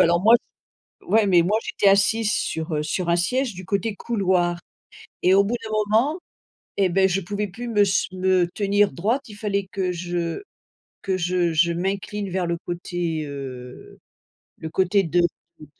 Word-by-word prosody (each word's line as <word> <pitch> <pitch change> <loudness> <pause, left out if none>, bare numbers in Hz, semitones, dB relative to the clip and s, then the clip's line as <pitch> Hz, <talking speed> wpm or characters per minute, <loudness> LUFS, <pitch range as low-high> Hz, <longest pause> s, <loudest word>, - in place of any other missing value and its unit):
alors 170 +1 +4
moi 225 +3 +7 0.7
s - - -20
ouais. 220 -1 +3
Mais 175 -3 +5
moi 210 +5 +1
j'étais 200 - +1
assise 210 +2 +3
sur, 160 0 -2
heu, 150 - 0
sur 170 +3 -2
un 170 - +3
siège 245 +8 0
du 185 0 -9
côté 200 +2 -1
couloir 185 -6 0 0.6
et 185 +1 +5
au 200 - +6
bout 235 +4 -1
d'un 220 - -6 0.3
moment 300 +9 +1 0.6
et 195 -2 +3
beh, 190 +2 +3
je 180 - +1
pouvais 205 +3 -3
plus 240 +6 -7
me 210 -3 +2
s 195 -1 +1
me 185 -1 +2
tenir 205 0 +2
droite. 230 +10 -1
Il 210 - -11
fallait 200 -2 -2
que 190 -2 -1
je 175 - -3 0.6
que 190 -1 -1
je 175 -1 0
je 170 +2 +3
m'incline 195 +2 -3
vers 180 -1 -1
le 170 0 -1
côté, 175 -2 -3
heu, 130 -3 -9 0.6
le 160 - -6
côté 190 +3 +2
de 175 +2 +1
de 170 -2 -4
185 Hz, 180 wpm, -23 LUFS, 170-205 Hz, 0.7 s, moi